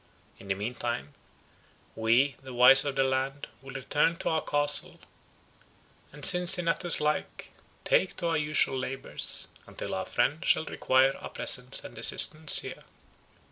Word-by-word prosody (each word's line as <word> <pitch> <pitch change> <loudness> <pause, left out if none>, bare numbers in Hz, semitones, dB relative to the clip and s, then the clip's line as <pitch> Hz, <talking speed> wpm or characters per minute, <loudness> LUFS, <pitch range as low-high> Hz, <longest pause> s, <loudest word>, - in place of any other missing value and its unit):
In 100 - -14
the 95 - -1
mean 105 +5 -5
time, 95 - -5 0.8
we, 120 +5 +1
the 130 -2 -11
wise 135 +3 +7
of 140 -1 -3
the 135 - +1
land, 135 +1 -3 0.2
will 135 0 -12
return 145 +5 0
to - - -3
our 160 -1 -1
Castle, 145 0 -2 1.1
and, 145 0 -4
Cincinnatus 175 -1 +3
like, 150 0 -4 0.3
take - - 0
to 170 - -2
our 165 - 0
usual 150 -3 0
labours, 130 +1 -3 0.2
until - - -7
our - - -4
friend 150 +4 -1
shall 160 - +1
require 130 -1 +1
our - - -9
presence - - 0
and - - -11
assistance 155 0 +4
here." - - -9
135 Hz, 145 wpm, -27 LUFS, 130-155 Hz, 1.1 s, wise